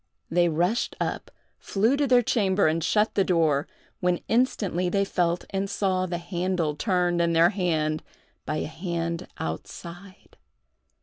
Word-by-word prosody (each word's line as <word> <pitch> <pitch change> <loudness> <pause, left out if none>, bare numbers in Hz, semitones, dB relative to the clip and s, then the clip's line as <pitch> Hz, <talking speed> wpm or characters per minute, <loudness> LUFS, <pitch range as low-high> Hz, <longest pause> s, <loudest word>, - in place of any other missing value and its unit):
They 175 0 +3
rushed 175 +9 0
up, - - -3 0.3
flew 220 +7 +1
to 285 0 +1
their 245 -1 +5
chamber, 200 -4 +2
and 160 +1 +1
shut 210 +5 +2
the 195 - +3
door, 160 -6 +2 0.3
when 180 -1 +1
instantly 200 -7 +1
they 200 +2 +1
felt 175 -2 0
and 195 0 -1
saw 185 -2 0
the 175 -1 -2
handle 175 -2 -1
turned 180 -2 +1
in 170 0 +2
their 165 +2 +5
hand 160 -6 0 0.4
by 155 - -3
a - - -2
hand 170 +1 -3
outside. 175 - -8
180 Hz, 145 wpm, -26 LUFS, 170-195 Hz, 0.4 s, their